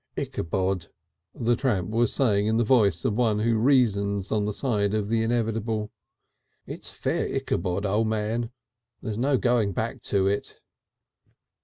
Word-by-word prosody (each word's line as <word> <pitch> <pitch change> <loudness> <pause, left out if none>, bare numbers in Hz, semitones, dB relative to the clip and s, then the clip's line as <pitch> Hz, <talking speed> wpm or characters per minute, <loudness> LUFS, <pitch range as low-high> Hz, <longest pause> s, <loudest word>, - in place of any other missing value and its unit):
"Itchabod," 95 +1 -2 0.5
the 120 0 +1
tramp 110 -7 -1
was 115 0 +2
saying 105 -6 +2
in 110 +1 +2
the 120 - +3
voice 105 -8 +3
of - - +2
one 110 -2 +1
who 115 +1 +2
reasons 105 -6 +2
on 105 -2 +1
the 105 - -1
side 105 -3 0
of 105 -1 -1
the 115 0 +2
inevitable. 115 -2 -1 0.7
"It's - - -8
Fair - - -2
Itchabod, 90 +4 -1
O' 105 +3 +2
Man. 110 +1 -1 0.5
There's 110 -2 -3
no 135 +2 +2
going 120 -5 +1
back - - -3
to 100 -2 +2
it." 100 +1 -2
110 Hz, 150 wpm, -26 LUFS, 100-115 Hz, 0.7 s, the